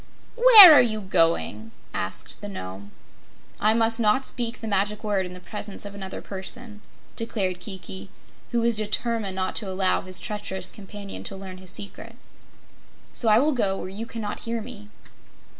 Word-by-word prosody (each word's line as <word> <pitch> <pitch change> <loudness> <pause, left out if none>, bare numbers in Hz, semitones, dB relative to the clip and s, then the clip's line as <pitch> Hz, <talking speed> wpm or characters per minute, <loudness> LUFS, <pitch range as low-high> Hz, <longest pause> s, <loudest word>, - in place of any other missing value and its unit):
"Where 455 -8 +11
are 290 - +8
you 220 -3 0
going?" 165 - 0 0.2
asked - - -2
the - - -6
Nome. 95 +1 -8 0.7
"I 215 +1 +3
must 225 0 +2
not 230 +4 +2
speak 235 -1 -1
the 225 - -6
Magic 205 0 -1
Word 200 -3 -1
in 180 - -10
the - - -9
presence 205 +2 -8
of 200 - -8
another 195 -1 -7
person," 210 +3 -7 0.3
declared 195 -6 -2
Kiki, 190 -1 -7 0.4
who 240 -1 0
was 235 0 +2
determined 215 -1 -1
not 185 0 -3
to 205 - -3
allow 190 0 +1
his 185 0 -4
treacherous 190 -3 -4
companion 200 -1 -9
to 195 - -4
learn 190 -1 -9
his 185 -1 -8
secret, 200 +2 -5 1.0
"so 230 - +1
I 215 - +6
will 290 +6 +3
go 200 -6 0
where 185 - -6
you 215 +4 -7
cannot 220 -3 -5
hear 230 0 -4
me." 215 -2 -10
205 Hz, 170 wpm, -24 LUFS, 190-230 Hz, 1.0 s, Where